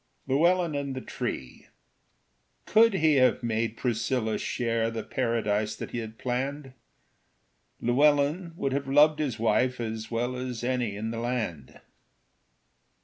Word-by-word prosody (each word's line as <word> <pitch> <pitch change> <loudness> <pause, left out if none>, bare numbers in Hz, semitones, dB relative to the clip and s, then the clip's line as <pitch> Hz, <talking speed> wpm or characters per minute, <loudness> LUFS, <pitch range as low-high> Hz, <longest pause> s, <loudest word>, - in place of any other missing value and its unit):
Llewellyn 170 +5 +2
and 140 -2 -3
the 130 - -4
Tree 65 - -5 1.0
Could 225 -1 +5
he 155 -4 +3
have 130 -1 +3
made 115 0 -1
Priscilla 115 -1 -1
share 115 -2 -1
The 115 -1 -4
paradise 110 -3 -1
that - - -7
he 120 - -3
had 110 -1 -7
planned, 135 +3 -3 1.1
Llewellyn 145 +6 +2
would 135 -5 -2
have 140 0 -2
loved 150 +3 +5
his 135 -7 -1
wife 120 +3 +1
As 110 -1 -4
well 120 +2 -1
as 125 -2 -5
any 120 -4 -1
in 110 +2 -3
the 115 - -4
land. 115 - -4
125 Hz, 135 wpm, -27 LUFS, 115-140 Hz, 1.1 s, Could